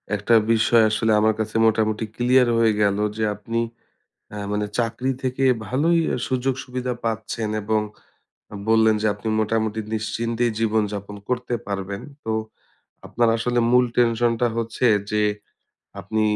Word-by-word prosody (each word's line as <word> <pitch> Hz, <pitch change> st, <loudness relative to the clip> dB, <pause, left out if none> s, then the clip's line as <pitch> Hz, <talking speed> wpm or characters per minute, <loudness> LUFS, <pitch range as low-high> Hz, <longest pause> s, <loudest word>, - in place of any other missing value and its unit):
একটা 105 Hz, +3 st, 0 dB, 0.2 s
বিষয় 115 Hz, 0 st, +4 dB
আসলে 110 Hz, +1 st, +1 dB
আমার 110 Hz, +1 st, +3 dB
কাছে 110 Hz, 0 st, -3 dB
মোটামুটি 110 Hz, 0 st, +1 dB
ক্লিয়ার 125 Hz, +1 st, +3 dB
হয়ে 115 Hz, -1 st, +4 dB
গেলো 100 Hz, 0 st, +2 dB
যে 110 Hz, -, -1 dB
আপনি 115 Hz, +3 st, -3 dB, 0.7 s
আ -, -, -6 dB, 0.2 s
মানে 105 Hz, 0 st, -1 dB
চাকরি 125 Hz, +2 st, -1 dB
থেকে 130 Hz, +1 st, -1 dB, 0.2 s
ভালোই 160 Hz, +8 st, +2 dB
আ -, -, 0 dB
সুযোগ-সুবিধা 125 Hz, -1 st, -2 dB
পাচ্ছেন 110 Hz, 0 st, -2 dB
এবং, 110 Hz, +1 st, +1 dB, 0.7 s
আ -, -, -11 dB, 0.2 s
বললেন 110 Hz, -1 st, +4 dB
যে 110 Hz, -, +2 dB
আপনি 105 Hz, +2 st, -8 dB
মোটামুটি 110 Hz, 0 st, 0 dB, 0.2 s
নিশ্চিন্তেই 115 Hz, +2 st, -1 dB
জীবনযাপন 105 Hz, -2 st, -1 dB
করতে 125 Hz, -1 st, -2 dB
পারবেন 100 Hz, 0 st, -4 dB, 0.2 s
তো, 110 Hz, -, -2 dB, 0.8 s
আপনার 120 Hz, -1 st, +1 dB
আসলে 120 Hz, +1 st, 0 dB
মূল 125 Hz, 0 st, +5 dB
tension 120 Hz, 0 st, +3 dB
টা 120 Hz, -, +4 dB
হচ্ছে 115 Hz, +2 st, -1 dB, 0.3 s
যে, 105 Hz, 0 st, +1 dB, 0.8 s
আপনি 110 Hz, +3 st, -1 dB
110 Hz, 140 wpm, -22 LUFS, 110-120 Hz, 0.8 s, মূল